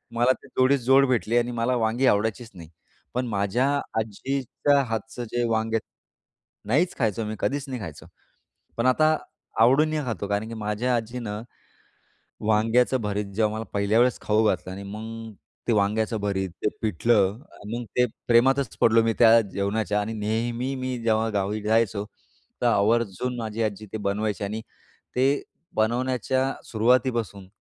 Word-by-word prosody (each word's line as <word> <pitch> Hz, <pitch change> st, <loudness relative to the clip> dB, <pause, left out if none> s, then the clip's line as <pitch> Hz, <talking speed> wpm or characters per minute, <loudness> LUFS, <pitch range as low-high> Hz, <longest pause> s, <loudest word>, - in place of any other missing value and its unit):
मला 120 Hz, +2 st, +4 dB
ते -, -, -14 dB
जोडीस 130 Hz, +2 st, +2 dB
जोड 135 Hz, +1 st, +6 dB
भेटली 120 Hz, -2 st, +1 dB
आणि 120 Hz, 0 st, +1 dB
मला 120 Hz, +1 st, 0 dB
वांगी 115 Hz, +2 st, +1 dB
आवडायचीच 110 Hz, +3 st, +1 dB
नाही. 85 Hz, -3 st, -11 dB, 0.4 s
पण 125 Hz, +1 st, -1 dB
माझ्या 105 Hz, +5 st, +1 dB, 0.3 s
आजीच्या 135 Hz, +5 st, 0 dB
हातचं 115 Hz, +2 st, -4 dB
जे 120 Hz, 0 st, 0 dB
वांग 110 Hz, 0 st, 0 dB, 0.9 s
नाहीच 155 Hz, +11 st, +2 dB
खायचो 110 Hz, -2 st, 0 dB
मी 110 Hz, +1 st, -4 dB
कधीच 140 Hz, 0 st, -1 dB
नाही 130 Hz, -, -4 dB
खायचो. 80 Hz, -6 st, -8 dB, 0.7 s
पण 115 Hz, -, 0 dB
आता 155 Hz, +5 st, +4 dB, 0.5 s
आवडीने 150 Hz, +6 st, +4 dB
खातो 105 Hz, -4 st, -3 dB
कारण 105 Hz, +2 st, -1 dB
की 115 Hz, -, -7 dB
माझ्या 110 Hz, +3 st, -1 dB
आजीने 120 Hz, 0 st, -4 dB, 1.2 s
वांग्याचं 115 Hz, +4 st, +3 dB
भरीत 105 Hz, 0 st, -1 dB
जेव्हा 110 Hz, 0 st, +1 dB
मला 110 Hz, +1 st, -4 dB
पहिल्या 100 Hz, +2 st, +2 dB
वेळेस 125 Hz, +1 st, +3 dB
खाऊ 110 Hz, +1 st, +2 dB
घातलं 90 Hz, -2 st, 0 dB
आणि 100 Hz, -, -7 dB
मग 110 Hz, +1 st, -7 dB, 0.4 s
ते 120 Hz, -, +4 dB
वांग्याचं 110 Hz, +2 st, +1 dB
भरीत, 95 Hz, -2 st, -1 dB, 0.2 s
ते -, -, +4 dB
पिठलं 105 Hz, 0 st, +2 dB, 0.3 s
मग 120 Hz, +1 st, -3 dB
ते 125 Hz, -, +5 dB, 0.2 s
प्रेमातच 130 Hz, +1 st, +3 dB
पडलो 115 Hz, 0 st, +5 dB
मी 115 Hz, -, +2 dB
त्या 115 Hz, -1 st, +7 dB
जेवणाच्या 105 Hz, 0 st, -1 dB
आणि 105 Hz, +2 st, -3 dB
नेहमी 115 Hz, +5 st, -2 dB
मी 130 Hz, -1 st, -3 dB
जेव्हा 110 Hz, 0 st, +2 dB
गावी 100 Hz, +2 st, -1 dB
जायचो 105 Hz, -2 st, +1 dB, 0.6 s
तर -, -, +3 dB
आवर्जून 115 Hz, +3 st, +1 dB
माझी 110 Hz, 0 st, -3 dB
आजी 110 Hz, -1 st, -3 dB
ते -, -, -3 dB
बनवायची 105 Hz, 0 st, -1 dB
आणि 105 Hz, +2 st, -3 dB, 0.6 s
ते 130 Hz, +2 st, +3 dB, 0.5 s
बनवण्याच्या 130 Hz, +3 st, 0 dB, 0.2 s
सुरुवातीपासून 115 Hz, -4 st, +1 dB
115 Hz, 150 wpm, -25 LUFS, 105-125 Hz, 1.2 s, त्या